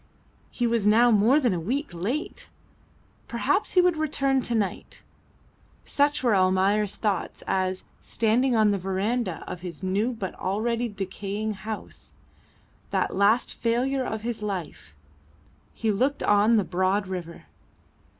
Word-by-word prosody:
He 245 Hz, -, -2 dB
was 230 Hz, -3 st, +1 dB
now 235 Hz, +3 st, +5 dB
more 225 Hz, +7 st, +5 dB
than 245 Hz, -8 st, +1 dB
a 175 Hz, -, -1 dB
week 270 Hz, -, -2 dB
late! 230 Hz, -, -4 dB, 0.8 s
Perhaps 390 Hz, -, 0 dB
he 365 Hz, -, +6 dB
would 355 Hz, -2 st, +2 dB
return 275 Hz, -3 st, +1 dB
to 240 Hz, -1 st, -2 dB
night. 205 Hz, -4 st, -3 dB, 0.8 s
Such 285 Hz, -1 st, +1 dB
were 235 Hz, -4 st, +3 dB
Almayer's 190 Hz, +2 st, +2 dB
thoughts 205 Hz, -5 st, -2 dB
as, 185 Hz, 0 st, -1 dB, 0.2 s
standing 235 Hz, +3 st, +1 dB
on 215 Hz, -2 st, +4 dB
the 200 Hz, -, 0 dB
verandah 195 Hz, +1 st, -2 dB
of 175 Hz, -, -7 dB
his 180 Hz, -1 st, -8 dB
new 200 Hz, +6 st, 0 dB
but 200 Hz, -5 st, -5 dB
already 230 Hz, +5 st, -1 dB
decaying 200 Hz, +1 st, -4 dB
house 210 Hz, +2 st, -8 dB, 0.8 s
that -, -, -1 dB
last 205 Hz, +5 st, +3 dB
failure 255 Hz, +3 st, 0 dB
of 220 Hz, -3 st, -4 dB
his 235 Hz, -2 st, -3 dB
life 180 Hz, -, -5 dB, 0.8 s
he 220 Hz, -1 st, -1 dB
looked 260 Hz, +8 st, 0 dB
on 205 Hz, +3 st, +4 dB
the 210 Hz, -, +3 dB
broad 185 Hz, +3 st, 0 dB
river. 180 Hz, -3 st, -6 dB
215 Hz, 140 wpm, -26 LUFS, 190-240 Hz, 0.8 s, he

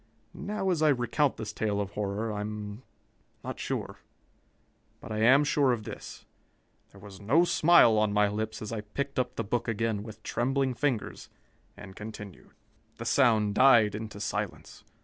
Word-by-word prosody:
Now, 195 Hz, -1 st, -2 dB
as 165 Hz, -3 st, 0 dB
I 155 Hz, -, +5 dB
recount 135 Hz, +2 st, +1 dB
this 110 Hz, -, -6 dB
tale 105 Hz, -2 st, -1 dB
of 100 Hz, -1 st, -3 dB
horror, 105 Hz, +2 st, -3 dB
I 105 Hz, -, -3 dB
am 105 Hz, +1 st, -6 dB, 0.6 s
not -, -, -6 dB
sure. -, -, -4 dB, 1.0 s
But -, -, -10 dB
I 110 Hz, -, -2 dB
am 130 Hz, +6 st, +6 dB
sure 145 Hz, -2 st, +2 dB
of 110 Hz, -3 st, -4 dB
this: -, -, -9 dB, 0.6 s
There 100 Hz, -, -17 dB
was 100 Hz, 0 st, -12 dB
no 140 Hz, +12 st, +3 dB
smile 155 Hz, -11 st, +5 dB
on 105 Hz, -1 st, +2 dB
my 105 Hz, 0 st, +3 dB
lips 110 Hz, +1 st, -4 dB
as 110 Hz, -, -6 dB
I 110 Hz, -2 st, -3 dB
picked 135 Hz, +6 st, -4 dB
up 125 Hz, -1 st, -2 dB
the 115 Hz, -, -2 dB
book 120 Hz, +3 st, -2 dB
again 115 Hz, -2 st, -1 dB
with 110 Hz, 0 st, -11 dB
trembling 135 Hz, +2 st, 0 dB
fingers 125 Hz, -3 st, -2 dB, 0.5 s
and 100 Hz, -2 st, -11 dB
continued. 105 Hz, -3 st, -9 dB, 0.5 s
"The 115 Hz, -, -7 dB
sound 110 Hz, -5 st, +3 dB
died 115 Hz, -4 st, +5 dB
into 105 Hz, -1 st, -6 dB
silence. 105 Hz, -1 st, -5 dB
110 Hz, 170 wpm, -28 LUFS, 105-130 Hz, 1.0 s, am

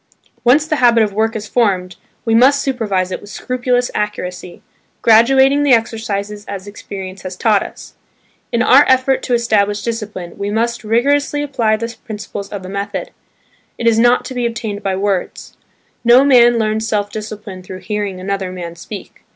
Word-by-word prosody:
Once 280 Hz, +5 st, +4 dB
the 310 Hz, -1 st, -1 dB
habit 235 Hz, -3 st, +5 dB
of 205 Hz, -2 st, -2 dB
work 220 Hz, +2 st, 0 dB
is 210 Hz, -1 st, -5 dB
formed, 185 Hz, -7 st, 0 dB, 0.3 s
we 225 Hz, -, +1 dB
must 260 Hz, +5 st, +5 dB
supervise 205 Hz, -8 st, -1 dB
it -, -, -4 dB
with 205 Hz, -, -12 dB
scrupulous 250 Hz, +1 st, -1 dB
accuracy, 180 Hz, -4 st, -4 dB, 0.4 s
graduating 265 Hz, +5 st, +5 dB
the 285 Hz, -2 st, +4 dB
exercises 210 Hz, -3 st, -1 dB
as 195 Hz, -1 st, -6 dB
experience 195 Hz, -2 st, -8 dB
has 185 Hz, -1 st, -6 dB
taught 210 Hz, -2 st, +3 dB
us. -, -, -9 dB, 0.6 s
In 235 Hz, +1 st, +1 dB
our 270 Hz, +4 st, +7 dB
effort 260 Hz, +1 st, +3 dB
to 245 Hz, -, 0 dB
establish 210 Hz, -3 st, +1 dB
discipline, 210 Hz, -7 st, -5 dB
we 200 Hz, 0 st, -2 dB
must 230 Hz, +2 st, -1 dB
rigorously 285 Hz, +6 st, +1 dB
apply 235 Hz, -7 st, +1 dB
the 230 Hz, +1 st, -5 dB
principles 205 Hz, -2 st, -7 dB
of 200 Hz, -3 st, -6 dB
the -, -, -8 dB
method. 200 Hz, +1 st, -4 dB, 0.7 s
It 235 Hz, -, -4 dB
is 230 Hz, -1 st, +4 dB
not 240 Hz, +1 st, +4 dB
to -, -, -6 dB
be 245 Hz, -1 st, 0 dB
obtained 220 Hz, -3 st, -5 dB
by 195 Hz, -1 st, -1 dB
words; 195 Hz, -1 st, -3 dB, 0.5 s
no 245 Hz, +3 st, +6 dB
man 240 Hz, -3 st, +6 dB
learns 220 Hz, 0 st, 0 dB
self 205 Hz, -2 st, -1 dB
discipline 210 Hz, -3 st, -7 dB
"through 185 Hz, 0 st, -9 dB
hearing 205 Hz, -3 st, -3 dB
another 190 Hz, 0 st, -3 dB
man 170 Hz, -2 st, -7 dB
speak." 195 Hz, +4 st, -10 dB
220 Hz, 170 wpm, -17 LUFS, 200-240 Hz, 0.7 s, our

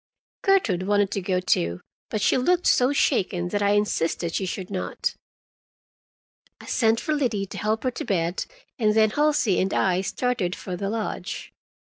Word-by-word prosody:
Gertrude 220 Hz, -, +2 dB
wanted 205 Hz, -1 st, +2 dB
to 200 Hz, -, -2 dB
go, 185 Hz, 0 st, 0 dB
too, 85 Hz, -, 0 dB, 0.3 s
but 215 Hz, -, -2 dB
she -, -, +4 dB
looked 350 Hz, +8 st, +2 dB
so 250 Hz, +2 st, +4 dB
shaken 185 Hz, -11 st, +1 dB
that 205 Hz, +2 st, -1 dB
I 200 Hz, 0 st, +3 dB
insisted 170 Hz, -5 st, 0 dB
she 190 Hz, -, -1 dB
should 185 Hz, +1 st, -5 dB
not. 185 Hz, -2 st, -2 dB, 1.5 s
I -, -, -12 dB
sent 225 Hz, -1 st, +2 dB
for 310 Hz, -, -1 dB
Liddy 240 Hz, -9 st, 0 dB
to -, -, -9 dB
help 215 Hz, +1 st, -1 dB
her 255 Hz, -, +1 dB
to -, -, -5 dB
bed, 175 Hz, -3 st, -1 dB, 0.3 s
and 215 Hz, -2 st, +2 dB
then 220 Hz, -1 st, +4 dB
Halsey 295 Hz, -8 st, +2 dB
and 190 Hz, +1 st, 0 dB
I 185 Hz, -1 st, +2 dB
started 200 Hz, -3 st, -1 dB
for 185 Hz, -, -6 dB
the 195 Hz, +2 st, -3 dB
lodge. 220 Hz, 0 st, -4 dB
205 Hz, 170 wpm, -25 LUFS, 185-235 Hz, 1.5 s, she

